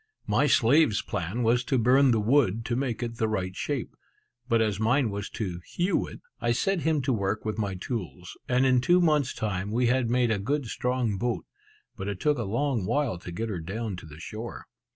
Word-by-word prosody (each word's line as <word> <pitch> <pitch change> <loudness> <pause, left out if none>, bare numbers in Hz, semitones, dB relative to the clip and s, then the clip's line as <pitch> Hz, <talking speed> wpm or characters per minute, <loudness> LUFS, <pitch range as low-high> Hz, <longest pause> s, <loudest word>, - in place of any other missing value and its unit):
My - - +2
slave's 135 -2 +4
plan 100 +5 -3
was 120 +2 +3
to 135 - +1
burn 130 +4 +5
the 115 -3 +3
wood 115 -2 +2
to 120 - -1
make 125 -2 -2
it 115 -1 -4
the 110 -3 +1
right 95 -4 -2
shape; 140 0 -3 0.5
but 115 - +4
as 105 -3 +1
mine 115 +1 +2
was 100 0 -4
to 90 -6 -3
hew 175 - 0
it, - - -11 0.2
I 120 - +1
set 195 +9 +1
him 155 -3 +1
to 130 0 +1
work 100 -1 -1
with 110 +1 -2
my 100 -3 -1
tools; 90 - -5
and 125 +1 +3
in 130 -1 +4
two 175 +5 +4
months' 150 -6 +2
time 100 -2 -2
we 120 +4 +1
had 125 -1 +2
made 120 -1 +2
a 105 - +1
good 140 +7 -1
strong 120 -3 -1
boat; 120 0 -1 0.5
but 100 -4 -5
it 100 -2 -3
took 150 +1 +1
a - - -1
long 115 -1 0
while 140 -11 0
to 90 - -8
get 110 +6 -3
her 95 -5 -3
down 100 +5 -4
to 85 - -10
the 75 0 -12
shore. 110 +6 -7
115 Hz, 215 wpm, -27 LUFS, 100-130 Hz, 0.5 s, burn